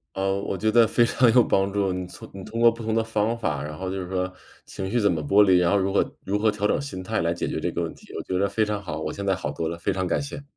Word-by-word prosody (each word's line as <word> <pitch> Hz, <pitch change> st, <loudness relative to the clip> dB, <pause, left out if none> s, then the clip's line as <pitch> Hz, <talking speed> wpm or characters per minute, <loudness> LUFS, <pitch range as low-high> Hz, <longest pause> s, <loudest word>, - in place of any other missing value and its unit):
呃， 95 Hz, 0 st, 0 dB
我 95 Hz, -, -3 dB
觉 110 Hz, +2 st, +1 dB
得 115 Hz, -2 st, +6 dB
非 120 Hz, +2 st, +3 dB
常 120 Hz, -2 st, +3 dB
有 125 Hz, -, +7 dB
帮 95 Hz, 0 st, +1 dB
助， 100 Hz, -2 st, 0 dB
你 90 Hz, 0 st, -3 dB
从 -, -, -11 dB
你 95 Hz, -, -7 dB
通 115 Hz, +3 st, -5 dB
过 120 Hz, -, +7 dB
不 115 Hz, 0 st, -9 dB
同 110 Hz, 0 st, -2 dB
的 115 Hz, 0 st, +1 dB
方 110 Hz, +1 st, -1 dB
法， 85 Hz, -11 st, -2 dB
然 75 Hz, +2 st, -7 dB
后 95 Hz, -, -4 dB
就 95 Hz, 0 st, -3 dB
是 90 Hz, -, -8 dB
说 95 Hz, 0 st, -1 dB, 0.3 s
情 95 Hz, 0 st, -5 dB
绪 120 Hz, -, +1 dB
怎 105 Hz, -3 st, +3 dB
么 80 Hz, -2 st, -2 dB
剥 100 Hz, +8 st, +5 dB
离， 95 Hz, -2 st, +5 dB
然 85 Hz, -1 st, +3 dB
后 100 Hz, -, +3 dB
如 95 Hz, 0 st, 0 dB
何 -, -, 0 dB
如 100 Hz, +2 st, -1 dB
何 110 Hz, +1 st, +3 dB
调 105 Hz, 0 st, -2 dB
整 -, -, +1 dB
心 140 Hz, -10 st, -6 dB
态 110 Hz, +2 st, -1 dB
来 85 Hz, 0 st, +1 dB
解 85 Hz, -, -3 dB
决 -, -, -3 dB
这 -, -, -1 dB
个 -, -, -3 dB
问 -, -, -4 dB
题， -, -, -16 dB
我 -, -, -4 dB
觉 95 Hz, -, -2 dB
得 100 Hz, +1 st, +2 dB
非 110 Hz, -, +1 dB
常 105 Hz, -1 st, -3 dB
好， 80 Hz, -4 st, -5 dB
我 -, -, -3 dB
现 100 Hz, -, -6 dB
在 95 Hz, -1 st, +1 dB
好 75 Hz, -, -4 dB
多 80 Hz, +2 st, -3 dB
了， 85 Hz, 0 st, -5 dB
非 85 Hz, -, -1 dB
常 95 Hz, -1 st, -2 dB
感 -, -, +1 dB
谢。 140 Hz, 0 st, -6 dB
100 Hz, 360 characters per minute, -25 LUFS, 90-110 Hz, 0.3 s, 有